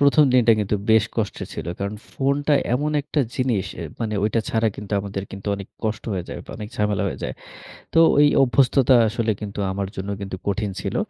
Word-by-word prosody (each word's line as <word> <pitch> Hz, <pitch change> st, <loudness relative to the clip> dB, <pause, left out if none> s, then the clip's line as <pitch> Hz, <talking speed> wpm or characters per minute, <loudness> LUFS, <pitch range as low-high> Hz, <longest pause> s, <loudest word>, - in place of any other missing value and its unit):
১ম 140 Hz, +2 st, +6 dB
দিনটা 120 Hz, -2 st, +6 dB
কিন্তু 105 Hz, 0 st, 0 dB
বেশ 110 Hz, -1 st, +6 dB
কষ্টের 110 Hz, -3 st, -2 dB
ছিল। -, -, -5 dB
কারণ 100 Hz, +1 st, -2 dB, 0.2 s
ফোনটা 140 Hz, +2 st, +1 dB, 0.2 s
এমন 150 Hz, +4 st, 0 dB
একটা 150 Hz, +1 st, -1 dB, 0.2 s
জিনিস 125 Hz, -7 st, +1 dB, 0.2 s
এ -, -, -4 dB, 0.2 s
মানে 110 Hz, -2 st, -1 dB
ঐটা 110 Hz, +2 st, +1 dB
ছাড়া 115 Hz, 0 st, +2 dB
কিন্তু 105 Hz, 0 st, -8 dB
আমাদের 100 Hz, 0 st, -5 dB
কিন্তু 100 Hz, 0 st, -9 dB
অনেক 100 Hz, 0 st, -8 dB, 0.2 s
কষ্ট 110 Hz, 0 st, -2 dB
হয়ে 90 Hz, -3 st, -2 dB
যায়, -, -, -5 dB, 0.2 s
অনেক 105 Hz, -1 st, -6 dB
ঝামেলা 105 Hz, -2 st, +1 dB
হয়ে -, -, -6 dB
যায়। -, -, -3 dB, 0.6 s
তো 165 Hz, -, +5 dB, 0.2 s
ওই 145 Hz, 0 st, +7 dB, 0.2 s
অভ্যস্ততা 130 Hz, +1 st, +4 dB
আসলে 115 Hz, +1 st, 0 dB
কিন্তু 105 Hz, -1 st, -5 dB
আমার 100 Hz, 0 st, -2 dB
জন্য 95 Hz, +1 st, -4 dB
কিন্তু 95 Hz, -1 st, -5 dB
কঠিন 100 Hz, 0 st, -1 dB
ছিল। -, -, -3 dB
110 Hz, 195 wpm, -23 LUFS, 100-130 Hz, 0.6 s, ওই